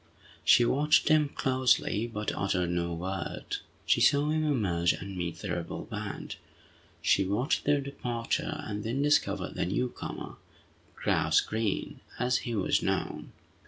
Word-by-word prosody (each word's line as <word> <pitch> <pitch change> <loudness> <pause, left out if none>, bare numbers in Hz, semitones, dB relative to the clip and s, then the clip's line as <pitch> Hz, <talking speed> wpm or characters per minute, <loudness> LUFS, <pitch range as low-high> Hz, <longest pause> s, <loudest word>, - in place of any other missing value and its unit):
She 120 - +6
watched 150 +7 +3
him 155 -2 +4
closely, 130 -5 +1
but 105 -1 -2
uttered 90 -3 0
no 85 0 -1
word. 90 +2 -4 0.3
She - - +3
saw 145 +1 +4
him 155 0 +1
emerge, 95 - +2
and 95 +1 -7
meet 85 -2 -3
the 100 - -4
rebel 85 -1 -4
band. - - -6 0.7
She 100 - +4
watched 105 +9 0
their 145 -1 +3
departure, 125 -4 -3
and 105 -1 -4
then 125 +5 -1
discovered 100 -10 +1
the - - -1
newcomer, 125 +7 -4 0.6
"Grouse - - +2
Green," 110 -2 -2 0.2
as 125 0 +2
he 115 - -1
was 100 - +2
known. - - -2
110 Hz, 140 wpm, -29 LUFS, 95-135 Hz, 0.7 s, She